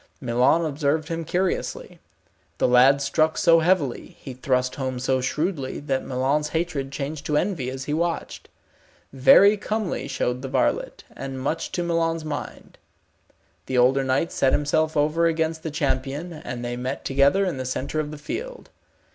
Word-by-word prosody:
Milon 130 +5 +2
observed 155 +1 -1
him 165 0 -3
curiously. 180 +3 -2 0.6
The - - +2
lad 130 +3 +5
struck 155 +3 +1
so 165 -1 +5
heavily, 160 -6 0
he 130 - -8
thrust 125 0 0
home 130 -2 -3
so 130 +1 0
shrewdly, 150 0 -2
that 135 -2 -1
Milon's 135 +4 0
hatred 155 -5 -2
changed 145 +1 -5
to 150 - +1
envy 165 -10 -1
as 130 0 -5
he 145 - -3
watched. 170 +1 -3 0.6
Very 200 +10 +6
comely 210 -9 -3
showed 125 -2 -2
the 135 - -5
varlet, - - -1
and 135 -1 -6
much 150 +5 -2
to 175 - -1
Milon's 165 -1 0
mind. 155 - -7 0.9
The 130 - -1
older 130 +2 +4
knight 135 +5 0
set 135 - +2
himself 155 +2 +1
over 155 +3 +2
against 160 0 -1
the 160 - -4
champion, 145 +2 -2
and 125 -6 -6
they 120 0 -3
met 130 +2 -4
together 140 +9 +3
in 180 -7 -2
the 130 - -3
centre 130 +4 -3
of 150 -1 -2
the 150 - -8
field. - - -7
145 Hz, 165 wpm, -24 LUFS, 130-165 Hz, 0.9 s, Very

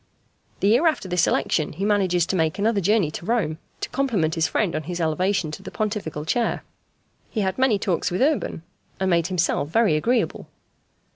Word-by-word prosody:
The 200 - +3
year 245 +10 +4
after 310 -11 0
this 180 -1 +2
election 155 - 0
he 190 +6 -3
manages 190 -5 +2
to 190 - -2
make 160 +1 +1
another 205 0 +1
journey 195 -4 +2
to 170 - -7
Rome 210 -10 0 0.2
to - - -3
compliment 220 -13 0
his 160 -1 +1
friend 190 -7 0
on 155 -1 -3
his 175 -1 -3
elevation 170 +1 0
to - - -8
the - - -8
Pontifical 200 -8 -3
chair. 235 +8 0 0.7
He 220 - -2
had 190 +4 -1
many 260 -5 +3
talks 185 -4 -1
with 180 +8 0
Urban, 285 - 0 0.4
and 190 -1 +1
made 170 -1 +2
himself 175 -5 0
very 215 -2 +3
agreeable. 235 +10 0
190 Hz, 190 wpm, -23 LUFS, 165-215 Hz, 0.7 s, year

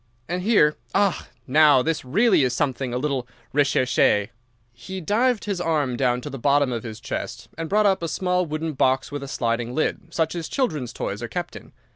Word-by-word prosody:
And 180 +1 -2
here—ah, 195 -1 +2 0.2
now, 145 -1 +5
this 160 -2 -1
really 195 - +3
is 125 -1 +1
something 135 -2 -1
a 125 - -1
little 135 -2 -2 0.3
recherché." 130 -7 +2 0.4
He 120 +11 -7
dived 220 +6 +1
his 200 -4 -2
arm 150 -7 0
down 125 -1 +1
to 145 - -6
the 135 - -6
bottom 140 +1 +3
of 120 -2 -2
the 110 -2 -7
chest, 120 - -6
and 165 0 -5
brought 210 +1 +3
up 195 -3 +3
a 165 - -2
small 180 +2 0
wooden 155 +1 -3
box 130 0 +1
with 145 -1 -4
a 140 - -6
sliding 120 -1 -2
lid, 165 +2 -2
such 160 -2 0
as 170 -2 -5
children's 150 - -1
toys - - -4
are - - -3
kept - - -5
in. - - -11
150 Hz, 195 wpm, -23 LUFS, 125-175 Hz, 0.4 s, now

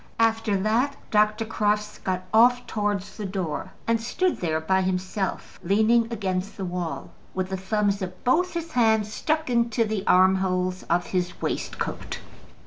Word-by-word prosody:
After 225 -2 +2
that 230 +8 +1 0.2
Dr. 215 +1 +3
Crofts 210 -1 -1
got 185 -1 -2
off 245 +2 +5
towards 205 -2 -2
the 210 - -4
door, 185 -5 -3
and 230 0 +1
stood 360 +10 0
there 160 -2 -1
by 190 +4 +1
himself, 185 +1 -2
leaning 220 +5 +3
against 195 -3 -2
the 195 - -3
wall, 175 -2 -4 0.2
with 185 0 -1
the 190 - -2
thumbs 200 +1 0
of 185 -1 -6
both 350 +8 +2
his 335 -1 -4
hands 220 -3 +2
stuck 315 +5 0
into 235 -1 +2
the 215 -2 -2
armholes 185 0 +3
of 175 +1 +2
his 180 -1 -2
waistcoat. - - -3
210 Hz, 150 wpm, -25 LUFS, 185-225 Hz, 0.2 s, off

